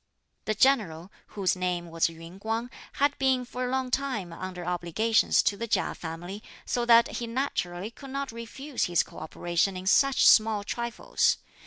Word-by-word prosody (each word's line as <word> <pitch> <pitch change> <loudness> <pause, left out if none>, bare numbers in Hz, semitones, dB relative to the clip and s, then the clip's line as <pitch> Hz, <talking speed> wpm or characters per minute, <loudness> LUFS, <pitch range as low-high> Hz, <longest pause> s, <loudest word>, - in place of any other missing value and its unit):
The 215 - 0
general, 200 -9 +2 0.3
whose 190 -2 +2
name 180 -2 -2
was 165 0 +2
Yün 165 +3 -11
Kuang, 225 +4 -3 0.2
had 285 +1 +1
been 260 -2 +2
for 250 +1 -4
a - - -2
long 260 -1 -1
time 235 -12 -2
under 180 0 -6
obligations 180 +6 +2
to 205 - +1
the 230 +3 -4
Chia 225 - 0
family, 175 +5 -7 0.2
so 240 -1 -1
that 235 0 +5
he 235 - -4
naturally 220 -6 -2
could 275 +4 -12
not 275 0 -3
refuse 245 +4 -4
his 175 -1 +2
co - - -12
operation 175 +4 -1
in 185 - -7
such 275 +7 +4
small 215 -2 +5
trifles. 235 - 0
215 Hz, 170 wpm, -27 LUFS, 175-250 Hz, 0.3 s, that